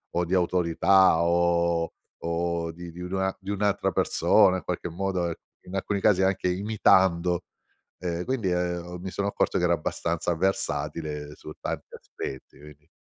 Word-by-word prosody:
o 90 0 +1
di 90 - -3
autorità 90 0 +4
o 85 -1 +2 0.3
o 85 0 -2
di 85 0 -9
di 85 - -12
nua 95 +1 -1
di 100 +1 -5
un'altra 100 0 +1
persona 95 -1 +4
in - - -7
qualche 90 -1 -3
modo, 90 -1 -1 0.3
in 95 - -7
alcuni 100 +1 -1
casi 95 -3 +4
anche 95 -1 +1
imitando, 90 -3 +3 0.6
uhm, 85 -1 -3
quindi, 120 -8 -1
uhm, 90 0 -2
mi 95 - -4
sono 100 +3 -2
accorto - - 0
che - - 0
ero - - +4
abbastanza 85 +1 -2
versatile 75 -5 -2
su 75 - -9
tanti - - -5
aspetti, 65 0 -8
quindi 75 +1 -15
90 Hz, 150 wpm, -26 LUFS, 85-95 Hz, 0.6 s, autorità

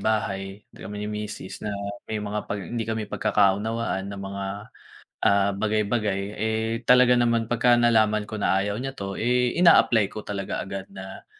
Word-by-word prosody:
bahay, 95 -2 -2
kami 105 - -8
ni - - -4
misis 105 -2 -6
na 105 - -2 0.4
may 110 - -2
mga 105 0 -4
pag 100 0 -3
hindi 115 +5 -3
kami 110 -1 -2
pagkakaunawaan 105 0 +1
na 100 - -6
mga, 100 0 -5 0.8
ah, 100 0 +4
bagay-bagay 105 -1 0 0.2
eh 110 +1 -1 0.2
talaga 125 0 +7
naman 115 -1 +2
pagka-nalaman 120 -3 +3
ko 110 - -5
na 95 0 +2
ayaw 100 0 -2
niya 135 +1 -4
to 100 0 -5
eh 125 +1 +2
ina-apply 120 - +5
ko 110 - -6
talaga 100 -2 -4
agad 95 0 -6
na. 95 0 -9
105 Hz, 160 wpm, -25 LUFS, 100-115 Hz, 0.8 s, talaga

